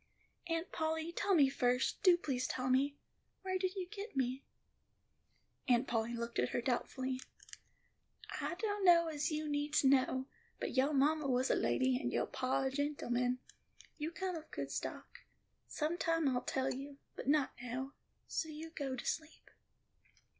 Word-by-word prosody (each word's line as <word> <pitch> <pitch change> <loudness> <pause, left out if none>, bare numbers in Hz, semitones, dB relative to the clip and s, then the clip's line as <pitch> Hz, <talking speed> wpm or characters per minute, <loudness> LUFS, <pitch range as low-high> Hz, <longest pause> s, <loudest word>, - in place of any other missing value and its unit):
"Aunt 330 +1 -2
Polly, 320 0 -1
tell 390 +3 +2
me 285 -5 +7
first, 250 -1 +1
do 365 -3 +7
please 260 -6 -1
tell 255 0 -1
me, 280 +2 +3 0.5
where 375 0 -1
did 370 +1 -1
you 370 -2 -3
get 405 0 -7
me?" 260 +1 0 1.2
Aunt 245 0 +4
Polly 230 0 0
looked 235 0 -3
at 125 - +2
her - - 0
doubtfully. 255 +1 -1 1.2
"I - - -2
dunno 370 -5 +4
as 300 -1 -1
you 305 -1 -2
need 290 0 -1
to 275 - +5
know. 260 -1 +3 0.3
But - - -3
yo 270 +3 +4
ma 290 +2 +4
was 255 0 +2
a - - +4
lady, 260 -1 +2
and - - -1
yo - - +1
pa 260 +1 0
a 265 - 0
gentleman. 250 -3 0 0.6
You 300 +2 -1
come 370 +1 -3
of 320 -1 -6
a - - -29
good - - -4
stock. - - -5 0.5
Sometime 330 0 0
I'll 250 -2 +1
tell 260 +1 0
you, 275 +2 -7 0.2
but - - -7
not 285 -1 +3
now; 255 +3 -4 0.3
so 320 - -2
you 315 +1 -7
go 275 -5 -3
to 245 - -7
sleep." 315 0 -4
285 Hz, 165 wpm, -36 LUFS, 260-325 Hz, 1.2 s, me